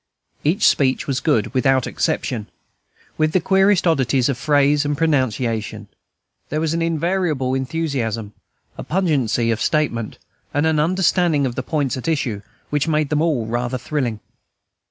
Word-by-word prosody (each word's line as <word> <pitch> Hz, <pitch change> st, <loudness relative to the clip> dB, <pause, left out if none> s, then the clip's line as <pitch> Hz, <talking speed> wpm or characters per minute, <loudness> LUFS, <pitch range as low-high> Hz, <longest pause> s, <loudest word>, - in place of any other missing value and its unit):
Every 160 Hz, +6 st, +2 dB
speech 130 Hz, -9 st, +3 dB
was 135 Hz, -2 st, -1 dB
good, 140 Hz, -10 st, 0 dB
without 130 Hz, -1 st, +2 dB
exception; 110 Hz, -4 st, -2 dB, 0.7 s
with 155 Hz, 0 st, +2 dB
the 185 Hz, -, +4 dB
queerest 190 Hz, +1 st, +3 dB
oddities 135 Hz, -5 st, +2 dB
of 135 Hz, -, -1 dB
phrase 145 Hz, 0 st, +3 dB
and 145 Hz, 0 st, -1 dB
pronunciation, 115 Hz, -8 st, -1 dB, 0.6 s
there 155 Hz, -, -1 dB
was 160 Hz, 0 st, 0 dB
an 165 Hz, -, -1 dB
invariable 165 Hz, -5 st, 0 dB
enthusiasm, 130 Hz, -7 st, -2 dB, 0.5 s
a -, -, -4 dB
pungency 135 Hz, -, +1 dB
of 115 Hz, +1 st, -2 dB
statement, 125 Hz, -8 st, -1 dB, 0.4 s
and 145 Hz, +2 st, +2 dB
an 160 Hz, -1 st, +2 dB
understanding 170 Hz, -2 st, +2 dB
of 125 Hz, -, -2 dB
the 130 Hz, -, -3 dB
points 140 Hz, -1 st, -1 dB
at 130 Hz, -, -6 dB
issue, 130 Hz, -10 st, -1 dB, 0.3 s
which 145 Hz, +1 st, 0 dB
made 155 Hz, -2 st, +1 dB
them 150 Hz, 0 st, +1 dB
all 150 Hz, -9 st, +1 dB
rather 120 Hz, +3 st, -2 dB
thrilling. 125 Hz, -4 st, -3 dB
145 Hz, 150 wpm, -20 LUFS, 125-160 Hz, 0.7 s, the